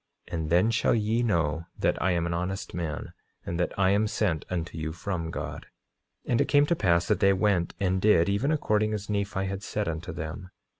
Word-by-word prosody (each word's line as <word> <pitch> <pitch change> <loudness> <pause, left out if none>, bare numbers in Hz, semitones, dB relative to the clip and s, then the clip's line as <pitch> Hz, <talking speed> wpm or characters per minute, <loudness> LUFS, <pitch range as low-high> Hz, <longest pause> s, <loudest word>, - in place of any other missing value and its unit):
And 80 -2 -3
then 90 +7 +4
shall 110 - +2
ye 110 +1 +1
know 85 -7 0
that - - 0
I 95 - +2
am 85 -1 0
an 85 - -1
honest 90 +3 -3
man, 80 -4 -4 0.3
and 85 - -3
that 90 - +1
I 95 0 +4
am 105 +2 +3
sent 95 -7 -1
unto 85 -2 -3
you 80 0 -3
from 85 -2 -3
God. - - -6 0.6
9:37 - - -4
And 120 - +3
it - - +1
came 145 0 +5
to 170 - +1
pass 85 - +2
that - - +2
they 100 0 +5
went 95 -3 +1
and 95 -1 +1
did, 90 -5 +5
even 105 +9 +1
according 110 -7 +1
as 105 0 -5
Nephi 100 -1 -1
had 95 0 -4
said 105 0 -3
unto 80 +1 -4
them. 85 +4 -6
95 Hz, 215 wpm, -27 LUFS, 85-105 Hz, 0.6 s, came